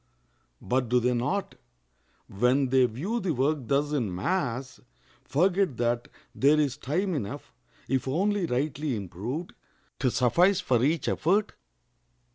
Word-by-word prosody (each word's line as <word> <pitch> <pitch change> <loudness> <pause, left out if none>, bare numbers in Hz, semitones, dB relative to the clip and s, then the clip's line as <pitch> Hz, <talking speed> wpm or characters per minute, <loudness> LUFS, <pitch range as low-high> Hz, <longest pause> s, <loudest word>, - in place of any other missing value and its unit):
But 125 -1 0
do 125 +1 +4
they 125 +1 +1
not, 145 +12 -1 0.7
when 125 +6 +1
they 130 -1 +4
view 175 - -3
the 180 -8 -1
work 145 +4 +1
thus 145 +3 +1
in 115 -11 -1
mass, 130 - -2 0.4
forget 175 - +1
that 120 0 0 0.3
there 145 +3 +4
is 140 -4 +1
time 175 +7 -1
enough, 115 -10 -5 0.3
if 130 0 -1
only 190 +6 +1
rightly 140 +1 -1
improved, 110 - -5 0.5
to 130 - +2
suffice 175 +11 +3
for 125 -10 +1
each 155 +4 +1
effort? 195 +6 +1
135 Hz, 130 wpm, -27 LUFS, 125-170 Hz, 0.7 s, do